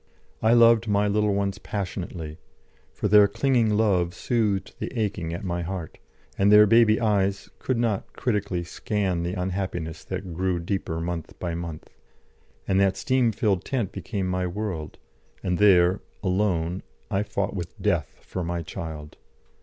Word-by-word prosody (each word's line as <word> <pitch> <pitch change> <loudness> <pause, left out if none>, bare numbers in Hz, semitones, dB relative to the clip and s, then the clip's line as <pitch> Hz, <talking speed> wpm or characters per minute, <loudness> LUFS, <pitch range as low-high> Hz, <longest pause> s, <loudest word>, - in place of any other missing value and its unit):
I 110 +1 +4
loved 115 -1 +6
my 105 0 +2
little 105 0 +2
ones 100 -1 -1
passionately, 85 -5 -5 0.5
for - - -2
their 105 0 +7
clinging 120 +2 +2
love 90 -5 +2
soothed 105 -3 0
the - - -4
aching 95 -6 -2
at 85 - -5
my 85 -2 -2
heart, 85 -2 -5 0.4
and 100 +1 +5
their 105 0 +9
baby 110 0 +5
eyes 100 -3 0
could 130 - -1
not 115 -4 -1
critically 100 -6 -1
scan 95 0 -2
the 85 +2 -2
unhappiness 90 -3 -3
that 90 -3 -5
grew 90 +1 0
deeper 85 -2 -3
month 85 -1 -5
by 85 -2 -3
month; 85 -2 -6 0.8
and 95 0 +2
that 95 -1 +3
steam 125 +2 +2
filled 105 -4 0
tent 120 -8 -2
became 100 -5 -4
my 90 0 -1
world, 90 -4 -4 0.5
and 90 -2 0
there, 95 -2 +5 0.2
alone, 90 -3 0 0.3
I 95 - +1
fought 100 -1 -2
with 85 -2 -6
Death 85 -10 -1
for 90 - -4
my 85 0 -3
child. 75 -2 -7
95 Hz, 155 wpm, -25 LUFS, 85-105 Hz, 0.8 s, their